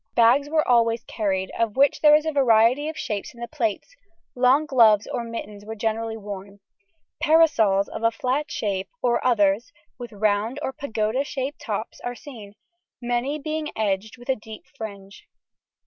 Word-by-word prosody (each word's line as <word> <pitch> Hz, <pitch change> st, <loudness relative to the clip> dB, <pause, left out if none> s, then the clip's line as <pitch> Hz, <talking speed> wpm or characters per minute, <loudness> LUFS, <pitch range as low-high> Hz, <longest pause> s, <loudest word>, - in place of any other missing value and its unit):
Bags 250 Hz, +5 st, +4 dB
were 310 Hz, 0 st, +1 dB
always 230 Hz, -1 st, +3 dB
carried, 190 Hz, -3 st, -2 dB
of 230 Hz, -2 st, 0 dB
which 280 Hz, 0 st, +3 dB
there 300 Hz, -1 st, +7 dB
is 305 Hz, +1 st, +2 dB
a 315 Hz, -, 0 dB
variety 255 Hz, +1 st, +3 dB
of 315 Hz, -, -7 dB
shapes 210 Hz, +2 st, -4 dB
in -, -, -15 dB
the 235 Hz, -, -5 dB
plates; 235 Hz, -, -3 dB, 0.4 s
long 255 Hz, +4 st, +3 dB
gloves 225 Hz, -7 st, +5 dB
or 240 Hz, -, -4 dB
mittens 215 Hz, -3 st, -7 dB
were 220 Hz, +1 st, -7 dB
generally 225 Hz, +1 st, -2 dB
worn. 200 Hz, -1 st, -8 dB, 0.6 s
Parasols 260 Hz, -12 st, +4 dB
of -, -, -7 dB
a 230 Hz, -, +4 dB
flat 255 Hz, +6 st, -2 dB
shape, 195 Hz, -3 st, -3 dB
or 240 Hz, -1 st, +1 dB
others 210 Hz, -2 st, +2 dB, 0.3 s
with 240 Hz, -1 st, -7 dB
round 215 Hz, +4 st, 0 dB
or 265 Hz, -, -2 dB
pagoda 225 Hz, -1 st, -1 dB
shaped 280 Hz, 0 st, -5 dB
tops -, -, -4 dB
are 245 Hz, 0 st, -4 dB
seen, 225 Hz, -8 st, -11 dB, 0.5 s
many 245 Hz, +4 st, -1 dB
being 310 Hz, +1 st, -4 dB
edged 210 Hz, +1 st, -2 dB
with 245 Hz, +2 st, -15 dB
a 265 Hz, -, +3 dB
deep 220 Hz, -1 st, -11 dB
fringe. 200 Hz, -2 st, -9 dB
230 Hz, 165 wpm, -24 LUFS, 210-270 Hz, 0.6 s, there